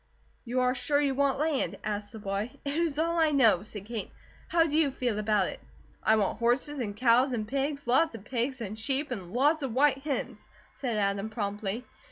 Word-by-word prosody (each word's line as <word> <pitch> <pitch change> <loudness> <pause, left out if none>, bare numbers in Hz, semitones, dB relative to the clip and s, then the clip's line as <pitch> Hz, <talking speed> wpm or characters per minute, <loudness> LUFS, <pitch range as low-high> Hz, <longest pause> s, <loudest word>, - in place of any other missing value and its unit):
"You 250 +2 0
are 250 0 +3
sure 285 +2 +1
you 280 -2 +2
want 275 0 +2
land?" 300 -1 0
asked 205 -1 -3
the 225 - -9
boy. 200 +1 -3 0.2
"It 280 - -1
is 325 -2 0
all 335 +2 +1
I 320 -1 +4
know," 235 -11 +4
said 205 -1 -7
Kate. 225 -1 -4 0.4
"How 335 -1 +4
do 300 -2 -2
you 315 -2 +4
feel 245 -5 -2
about 210 -3 +2
it?" - - -8 0.4
"I 220 - +4
want 210 -2 0
horses, 255 +5 +1
and 205 -4 -3
cows, 250 +2 +4
and 215 -3 -2
pigs 280 +3 -2
lots 260 +3 +3
of 210 - -9
pigs 255 +1 -2
and 215 0 -5
sheep, 275 +4 -1
and 185 -7 -5
lots 290 +7 +3
of 260 -4 -3
white 275 0 +4
hens," 265 -5 -4 0.3
said 240 -5 -3
Adam, 200 +1 0
promptly. 210 +1 -3
250 Hz, 210 wpm, -29 LUFS, 215-280 Hz, 0.4 s, I